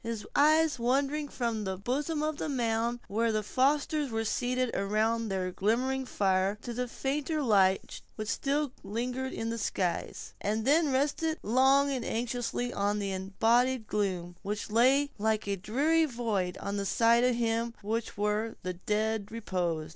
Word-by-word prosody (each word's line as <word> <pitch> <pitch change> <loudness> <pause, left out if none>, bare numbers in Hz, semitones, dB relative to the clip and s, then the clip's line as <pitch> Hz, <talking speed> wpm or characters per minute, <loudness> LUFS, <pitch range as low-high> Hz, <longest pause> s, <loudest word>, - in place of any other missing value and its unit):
His 230 -2 -4
eyes 310 -1 +4
wandered 275 +4 0
from 230 -3 -2
the 190 -1 -3
bosom 290 - -1
of 310 -1 -1
the 315 - -3
mound, 235 -2 0
where 225 +3 +1
the 215 -1 0
foresters 285 +5 +1
were 225 -1 -2
seated 250 +2 0
around 215 +3 0
their 185 -1 -2
glimmering 250 +8 0
fire, 195 -1 +1
to 240 - -5
the 250 +1 -2
fainter 290 +5 -2
light 195 -5 +2
which 215 -1 -5
still 285 +2 0
lingered 250 +6 -3
in 225 0 -3
the 230 - -3
skies, 185 -4 -2
and 215 +2 -1
then 300 +1 +4
rested 300 +4 0
long 270 +5 +4
and 260 -3 -2
anxiously 245 +1 -2
on 205 +1 0
the 200 -1 -2
embodied 225 +6 +1
gloom, 185 -5 -2
which 205 +1 -4
lay 270 +6 +4
like 220 0 +1
a 200 - 0
dreary 285 - +2
void 215 -9 -2
on 200 0 -4
that 200 0 -2
side 235 +2 +4
of 250 -1 +3
him 230 0 -1
where 215 0 -1
the 185 - -2
dead 210 +3 -1
reposed. 175 -8 -2
230 Hz, 160 wpm, -30 LUFS, 205-265 Hz, -, eyes